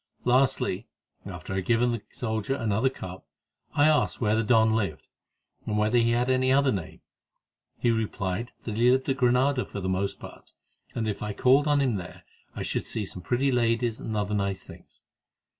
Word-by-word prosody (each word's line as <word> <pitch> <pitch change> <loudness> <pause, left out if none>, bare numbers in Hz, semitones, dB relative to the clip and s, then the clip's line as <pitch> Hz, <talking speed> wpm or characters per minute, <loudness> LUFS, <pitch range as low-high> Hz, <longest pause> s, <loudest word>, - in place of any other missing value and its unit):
Lastly, 125 -5 +2 0.4
after 90 0 -7
I - - -1
had 95 - -2
given 120 +2 +2
the 115 -2 -3
soldier 110 +2 -2
another 110 +1 +1
cup, 95 -7 -9 0.5
I 145 -1 +5
asked 155 -1 +2
where 110 -2 +2
the 110 - +2
don 110 0 +4
lived, 100 -9 -2 0.6
and 105 - -1
whether 110 +3 +3
he 115 0 +3
had 120 +1 +1
any 130 0 +2
other 140 0 +4
name. 95 -6 -5 0.8
He 120 - +2
replied 110 -1 -2
that 110 -2 -4
he 120 +2 +4
lived 130 +1 +2
at 135 - +1
Granada 125 +1 +2
for - - -7
the 95 - -3
most 95 +1 -1
part, - - -12 0.4
and 115 - -1
that 110 - 0
if 100 - -8
I 105 -1 -3
called 135 +7 +4
on 145 -1 +3
him 125 -6 +1
there 90 -1 -9 0.3
I - - -4
should - - -3
see 110 - -3
some 90 - -8
pretty 125 +8 +1
ladies 115 -1 +1
and 110 -1 -4
other 105 0 -1
nice 100 -2 -1
things. - - -15
115 Hz, 195 wpm, -27 LUFS, 100-125 Hz, 0.8 s, I